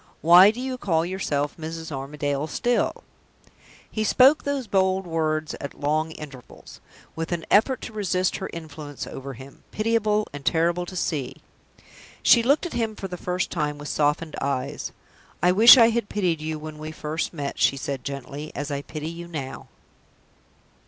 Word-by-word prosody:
Why 175 +4 +8
do 225 +3 -3
you 255 0 -4
call 165 -6 +1
yourself 150 -6 -2
'Mrs. 160 0 -6
Armadale' 145 +1 -3
still?" 240 +9 0 0.9
He 215 - -1
spoke 260 +7 +5
those 285 -2 -2
bold 190 -2 +1
words 155 -2 -1
at 140 - -7
long 155 +2 0
intervals, 135 -5 -12 0.3
with 165 +1 -4
an 170 -1 -2
effort 250 +5 +4
to 225 - -7
resist 185 -3 0
her 190 - -5
influence 155 -3 -7
over 135 +1 -7
him, 135 +3 -13
pitiable 215 -1 +1
and 145 -1 -7
terrible 170 +3 +1
to 185 - -8
see. 150 -7 -2 0.9
She 235 - +7
looked 280 +8 +2
at 350 - -5
him 225 -2 -1
for 195 - -5
the 180 - -6
first 180 +1 -2
time 150 -3 -2
with 145 0 -7
softened 150 +2 0
eyes. 140 +1 -2 0.5
"I 180 - +6
wish 225 +8 +9
I 230 -2 +7
had 230 -2 -1
pitied 180 -6 0
you 155 0 -3
when 155 0 -8
we 155 0 -6
first 155 0 -3
met," 145 -4 -5
she 140 - +3
said, 135 -1 -4
gently, 140 +2 -6
"as 145 +1 -4
I 140 0 -2
pity 155 +1 -6
you 170 +1 -7
now." 145 -6 -6
165 Hz, 170 wpm, -24 LUFS, 145-195 Hz, 0.9 s, wish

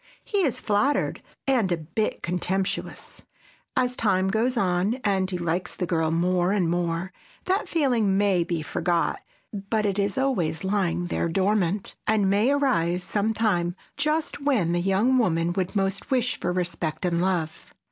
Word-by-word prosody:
He 410 - -1
is 295 -10 +1
flattered, 260 +8 +1 0.2
and 245 -9 +2
a 175 - +2
bit 165 +7 -3
contemptuous. 185 +2 -3 0.5
As 250 -1 +1
time 190 -5 +1
goes 235 +5 +1
on 185 +2 +1
and 190 -2 +1
he 180 - -2
likes 175 +1 -2
the 180 - -2
girl 165 -2 0
more 175 +2 +1
and 195 -4 +1
more, 175 +1 -1 0.3
that 380 +3 0
feeling 240 - +2
may 195 -4 +3
be 170 -2 -3
forgot, 170 +1 0 0.3
but 210 +2 -1
it 200 0 0
is 200 -1 0
always 190 -13 0
lying 185 -3 0
there 170 -1 -1
dormant, 195 +1 0
and 210 -2 +3
may 210 +5 +3
arise 185 -12 +1
sometime 205 -4 0 0.2
just 305 0 -1
when 255 - +2
the 175 0 +1
young 205 +8 +3
woman 170 -6 +1
would 185 +1 -2
most 195 0 -1
wish 250 -2 0
for 180 - -1
respect 170 -3 -2
and 170 -1 +1
love. 175 -4 -1
190 Hz, 155 wpm, -25 LUFS, 175-220 Hz, 0.5 s, may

